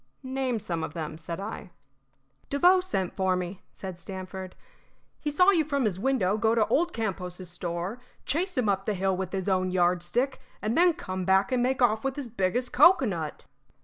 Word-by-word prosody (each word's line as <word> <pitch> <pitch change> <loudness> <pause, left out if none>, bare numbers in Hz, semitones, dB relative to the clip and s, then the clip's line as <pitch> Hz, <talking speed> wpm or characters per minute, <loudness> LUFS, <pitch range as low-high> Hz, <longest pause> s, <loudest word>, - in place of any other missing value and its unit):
"Name 260 -2 -1
some 170 -6 -3
of 150 - -5
them," 155 -1 -5
said 165 +1 -5
I. 205 -1 -6 0.8
"Devoe 355 +7 +5
sent 280 - -2
for 190 -1 +2
me," 180 +1 -4
said 185 -3 -8
Stamford. 185 0 -7 0.6
"He 300 - -2
saw 360 +6 +5
you 335 -5 +3
from 280 -4 0
his 190 -4 -1
window 215 -5 +1
go 225 +1 +3
to 220 -2 +4
old 340 +3 +2
Campos' 185 -4 -4
store, 175 +5 -4 0.3
chase 355 +4 -1
him 250 -4 +2
up 195 -1 +1
the 210 - 0
hill 190 0 +1
with 185 0 -4
his 190 -1 -3
own 185 -1 +2
yardstick, 180 +9 +1 0.2
and 220 +3 -1
then 350 0 +5
come 185 - -5
back 190 +3 +3
and 250 -1 +2
make 255 +1 +1
off 220 -2 +3
with 270 -1 -1
his 285 -4 -5
biggest 230 +3 -1
cocoanut." 240 - +3
200 Hz, 185 wpm, -27 LUFS, 185-260 Hz, 0.8 s, Devoe